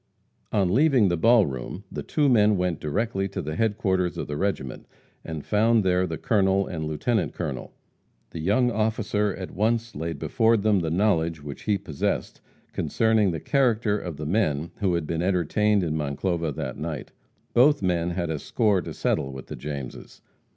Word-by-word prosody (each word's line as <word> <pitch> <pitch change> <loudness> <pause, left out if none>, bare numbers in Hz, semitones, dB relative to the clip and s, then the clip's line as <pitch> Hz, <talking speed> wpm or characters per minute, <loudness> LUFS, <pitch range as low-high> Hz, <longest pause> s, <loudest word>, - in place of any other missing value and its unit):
On 95 -3 +2
leaving 130 -6 +4
the 85 - +1
ball 115 +5 +5
room, 65 +8 -6
the - - -4
two 150 -2 +1
men 105 -5 +4
went 90 -3 -1
directly 95 +5 -1
to 100 - -6
the 75 +1 -4
headquarters 95 -4 0
of - - -3
the 75 - -5
regiment, 90 -8 -3 0.4
and 80 -3 -6
found 110 +1 +3
there 90 0 +2
the 80 -2 -4
colonel 100 -2 +2
and 80 -3 -4
lieutenant 85 +5 -1
colonel. 70 -7 -4 0.6
The - - -6
young 110 +9 +2
officer 110 -2 0
at 95 -1 -7
once 115 +3 0
laid 80 +2 -4
before 115 0 +2
them 105 -1 +2
the 80 -2 -1
knowledge 85 -4 +1
which 70 -1 -8
he 105 -2 +2
possessed 80 -7 -3 0.3
concerning 110 -3 +2
the 80 -2 -2
character 115 - +2
of 85 -6 -6
the 75 - -5
men 80 -4 0
who 100 -3 0
were 85 -1 +1
being 80 +1 -3
entertained 95 +3 +2
in 80 -3 -1
Monclova 80 +3 -1
that - - -5
night. 80 -3 -5 0.4
Both 140 +1 +5
men 85 -2 +1
had 85 -2 -2
a 75 - -2
score 105 - +1
to - - -7
settle 70 - 0
with 65 -1 -8
the - - -5
Jameses. 70 -3 -7
95 Hz, 180 wpm, -25 LUFS, 80-110 Hz, 0.6 s, ball